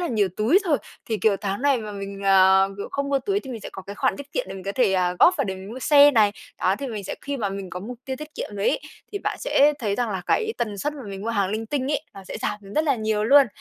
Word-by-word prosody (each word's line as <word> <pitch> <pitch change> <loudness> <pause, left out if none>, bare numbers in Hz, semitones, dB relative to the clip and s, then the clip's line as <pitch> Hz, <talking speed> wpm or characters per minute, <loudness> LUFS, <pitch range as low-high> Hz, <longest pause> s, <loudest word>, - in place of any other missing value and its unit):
là 350 - -1
nhiều 210 -5 +2
túi 235 - +4
rồi, 315 -6 +2 0.3
thì, 220 - -1
kiểu, 210 -2 +3
tháng 200 +3 -3
này 280 -2 +3
mà 210 -1 -6
mình, 200 0 -7
à, 190 0 +6
kiểu, 200 - -5
không 280 0 -2
mua 280 -1 +2
túi 400 +7 -1
thì 265 - -9
mình 235 -3 -6
sẽ - - -8
có 190 - -8
cái 200 +2 -8
khoản 260 +5 0
tiết 285 +1 -10
kiệm - - -1
để - - -6
mình 190 -1 -9
có 200 - -2
thể, 230 -4 +2
ờ, 180 -1 +1
góp 360 - +6
vào - - +1
để 190 - -3
mình 190 +1 -9
mua 250 - -6
xe 290 +1 +7
này. 215 -6 +4 0.3
Đó, 185 - +3
thì 280 - -4
mình 215 -5 -5
sẽ - - -4
khi 280 0 -4
mà 215 -6 -1
mình 195 -1 -6
có 180 - -5
mục 235 +5 -7
tiêu 265 -1 -4
tiết 305 +2 -10
kiệm - - -5
rồi 200 - +1
ấy, - - 0 0.3
thì 405 - -2
bạn - - -3
sẽ 300 - +4
thấy 210 -6 -1
rằng 240 0 -1
là 190 -3 -3
cái 445 -1 +1
tần 210 -4 -2
suất 295 +8 -1
mà 285 - -8
mình 195 0 -6
mua 225 - -3
hàng 200 -4 0
linh 220 +2 -3
tinh 275 +3 -1
ấy, 290 - 0
nó 195 -1 -10
sẽ - - -6
giảm - - -2 0.2
rất 310 - +2
là 285 -3 +3
nhiều 215 -1 0
luôn. 280 +3 +7
220 Hz, 315 wpm, -24 LUFS, 195-280 Hz, 0.3 s, xe